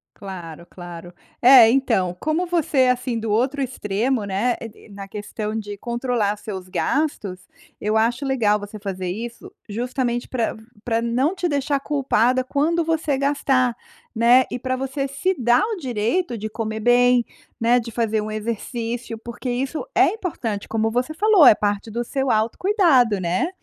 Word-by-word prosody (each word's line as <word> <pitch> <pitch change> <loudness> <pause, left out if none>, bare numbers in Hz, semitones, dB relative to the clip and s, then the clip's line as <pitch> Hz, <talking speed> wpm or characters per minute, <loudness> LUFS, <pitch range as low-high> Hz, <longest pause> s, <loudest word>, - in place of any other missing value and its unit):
Claro, 170 -4 -9
claro. 175 -1 -10 0.3
É, 245 -2 +9
então, 225 -9 +1
como 315 +4 0
você 335 -4 0
é 255 -1 +5
assim 250 -1 -1
do 225 -1 -3
outro 260 +6 +1
extremo, 235 -1 -1
né, 200 +5 0
e 225 -1 -10
e - - -18
na 200 -1 -9
questão 210 +1 -5
de 205 -1 -6
controlar 235 -3 -1
seus 190 -3 -7
gastos, 210 -5 -2 0.3
eu 215 +1 0
acho 235 +5 +1
legal 220 -6 +2
você 205 +1 -8
fazer 190 -2 -4
isso 230 +6 -6 0.2
justamente 240 +2 -2
para 235 -3 -1 0.3
para 230 -1 0
não 250 +9 0
te 360 -2 -1
deixar 285 -1 0
culpada 255 -3 +1
quando 320 +5 0
você 315 -3 0
gastar, 270 -3 +1 0.4
né, 240 +3 +5
e 250 - -3
para 255 +1 -2
você 270 +1 -3
se 320 +8 -1
dar 240 0 +3
o 440 -1 -2
direito 250 - -1
de 215 0 -4
comer 220 0 -4
bem, 245 +1 +4 0.4
né, 235 +2 +4
de 230 0 -7
fazer 220 -1 0
um 215 - -5
exercício, 230 +2 -4
porque 235 +3 -7
isso 265 - -2
é - - +5
importante, 240 - -4
como 225 0 0
você 250 +6 -1
falou, 410 -3 +5
é 215 - +9
parte 205 +1 -2
do 240 +2 -3
seu 270 +1 -2
autocuidado, 250 - +3
né. 180 - 0
240 Hz, 165 wpm, -22 LUFS, 215-270 Hz, 0.4 s, É